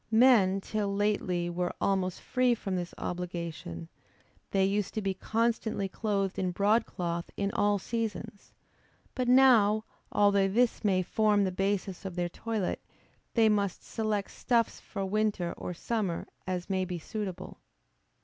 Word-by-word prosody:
Men 220 -5 +5
till 205 0 -2
lately 200 -4 0
were 175 +1 -2
almost 190 -2 0
free 250 -1 +2
from 195 -4 -3
this 175 -1 -3
obligation; 170 - -5 0.6
they 195 -1 +2
used 200 0 -1
to 215 - 0
be 195 -1 0
constantly 220 0 0
clothed 195 -1 -1
in 185 - 0
broadcloth 180 -3 0
in 200 0 0
all 205 0 +2
seasons: 220 -1 -4 0.6
but 255 -2 -1
now, 230 -5 +5 0.3
although 200 -1 +4
this 235 +5 +1
may 190 -3 +2
form 210 +1 +2
the 190 - 0
basis 195 0 -1
of 190 -3 -6
their 175 -1 -1
toilet, 220 0 -3 0.5
they 225 -2 +5
must 200 -3 +1
select 215 -3 -2
stuffs 235 -3 +1
for 195 -2 -5
winter 205 -3 0
or - - -5
summer, 190 -1 -2 0.2
as 180 -1 -2
may 190 -1 0
be 180 -1 -4
suitable. 195 +2 -6
200 Hz, 140 wpm, -30 LUFS, 185-215 Hz, 0.6 s, Men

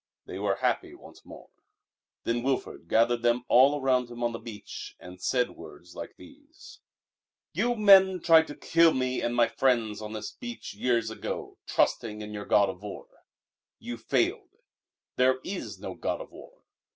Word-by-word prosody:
They - - -7
were - - 0
happy 360 -1 -1
once 355 - -16
more. - - -13 0.7
Then 120 +1 -1
Wilfrid 130 -9 -3
gathered 115 +4 +2
them 120 +1 +1
all 140 +4 +5
around 130 -2 +1
him 120 0 -7
on 120 - +1
the 115 - -6
beach 110 -3 -9
and 90 0 -12
said 125 +3 +1
words 85 +2 -13
like - - -8
these: 290 +2 -16 0.7
"You 240 0 +1
men 190 -3 +6
tried 160 -1 +5
to 145 - -8
kill 165 -1 +3
me 130 0 -1
and 120 - -1
my 120 -1 +4
friends 115 -5 0
on 105 0 -6
this 110 -1 -5
beach 240 -1 -8
years 115 -3 0
ago, - - -6
trusting 105 -2 0
in 105 0 -8
your 105 -1 -6
god 100 -1 +4
of 95 0 -7
war. 105 -1 -8 0.7
You - - -6
failed. - - -1 0.6
There 130 +1 +3
is 120 - -5
no - - -7
god - - -3
of - - -10
war. - - -15
120 Hz, 170 wpm, -28 LUFS, 110-160 Hz, 0.7 s, men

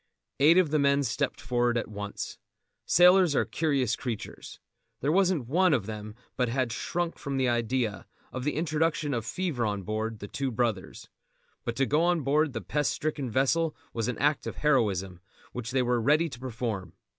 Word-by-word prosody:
Eight 155 +5 +6
of 180 -5 +3
the 155 - +2
men 140 0 +3
stepped 115 -3 -1
forward 120 +1 +1
at 120 - -2
once. 105 -1 -6 0.5
Sailors 180 -2 +6
are 110 - +2
curious 130 -1 0
creatures. 120 -5 -6 0.4
There 140 - 0
wasn't 180 -6 +2
one 175 +3 +3
of 110 -7 -2
them 105 0 -7 0.2
but 125 -2 0
had 125 -1 0
shrunk 175 +8 -3
from 140 -1 -3
the 130 -1 +2
idea, 120 -2 -1 0.3
of 130 - -4
the 150 - -1
introduction 155 -2 0
of 115 -2 -3
fever 165 -5 -2
on 100 -2 -1
board 110 +2 -3
The 100 - -8
Two 135 +5 -2
Brothers; 115 -5 -2 0.6
but 120 - -2
to 135 - +2
go 150 +4 +2
on 175 -1 +2
board 145 +1 +2
the 115 - -3
pest 145 - 0
stricken 150 -4 -2
vessel 150 +6 +1 0.2
was 115 -2 -2
an 125 - -2
act 145 +1 +1
of - - -4
heroism 100 - +1 0.3
which 120 -2 -5
they 130 0 +1
were 120 -1 +1
ready 150 +7 +3
to 120 - -9
perform. 115 -8 -4
130 Hz, 185 wpm, -28 LUFS, 115-150 Hz, 0.6 s, Eight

